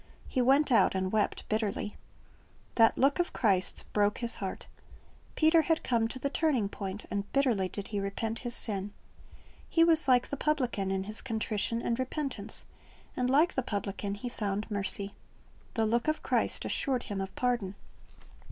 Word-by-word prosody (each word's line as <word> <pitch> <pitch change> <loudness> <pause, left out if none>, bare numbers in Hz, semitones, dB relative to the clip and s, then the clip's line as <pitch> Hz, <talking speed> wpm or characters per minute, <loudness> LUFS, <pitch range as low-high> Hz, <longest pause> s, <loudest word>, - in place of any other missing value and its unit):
He 255 - 0
went 270 +3 +3
out 230 - +4
and 185 0 -1
wept 215 -1 -1
bitterly. 215 -1 -2 0.8
That 225 -1 +4
look 275 +5 +3
of 350 - 0
Christ's 195 -6 +2
broke 205 0 0
his 235 -2 +4
heart. 190 -1 -5 0.7
Peter 320 +1 +5
had 325 +1 0
come 230 -2 +1
to 250 - -6
the 270 - -2
turning 270 -12 +1
point, 200 0 -6
and 200 0 -3
bitterly 240 -9 +2
did 200 +2 -7
lie 205 - 0
repent 220 +3 -3
his 240 -1 -3
sin. 200 -2 0 0.8
He 330 - +4
was 325 -4 +5
like 250 -1 +4
the 285 - -4
publican 250 -11 0
in 190 0 -1
his 215 +2 -5
contrition 225 -1 -1
and 235 +1 -1
repentance, 260 -5 -4 0.5
and 250 0 0
like 310 +7 +4
the 260 - 0
publican 200 -2 -4
he 225 +5 -6
found 210 -2 -3
mercy. 200 0 +2 0.6
The 225 -2 +2
look 235 +4 0
of 310 0 0
Christ - - 0
assured 260 -3 -1
him 200 -3 -4
of 190 - -6
pardon. 240 -6 -1
225 Hz, 170 wpm, -30 LUFS, 200-260 Hz, 0.8 s, Peter